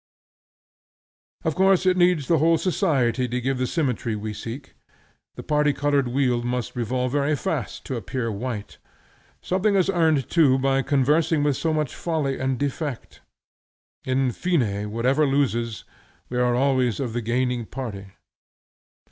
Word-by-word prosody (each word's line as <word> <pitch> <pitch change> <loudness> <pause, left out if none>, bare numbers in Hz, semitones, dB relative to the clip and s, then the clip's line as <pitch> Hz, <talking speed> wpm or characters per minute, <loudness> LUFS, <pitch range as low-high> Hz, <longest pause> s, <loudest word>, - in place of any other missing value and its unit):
Of 160 - +1
course 190 +2 +3
it 185 -1 +4
needs 175 -5 +3
the 165 -3 +3
whole 165 +2 +4
society 135 - +1
to 125 +1 -2
give 130 +1 -1
the 130 - 0
symmetry 125 -8 -1
we 105 +1 -5
seek. 125 +6 -8 0.6
The - - -8
party 150 -1 +2
colored 145 -2 +1
wheel 125 -1 +1
must 120 0 -3
revolve 125 +1 -1
very 145 +2 +1
fast - - -4
to 130 - -3
appear 115 +3 -3
white. 110 0 -5 0.6
Something 195 +3 +1
is 190 0 +3
earned 160 -6 +2
too 145 -6 +4
by 135 0 +1
conversing 145 +3 +2
with 145 -2 +2
so 160 +5 -1
much 155 -4 -1
folly 155 -5 -2
and 130 -1 -1
defect. 145 -1 -4 0.8
In 130 0 +1
fine, 175 +4 0 0.3
whoever 130 +7 +1
loses, 120 -5 0 0.5
we 125 - -2
are 125 -1 +2
always 130 -3 +1
of 125 -5 -3
the 120 - -2
gaining 120 0 -1
party. 110 -7 -6
135 Hz, 150 wpm, -24 LUFS, 125-155 Hz, 0.8 s, it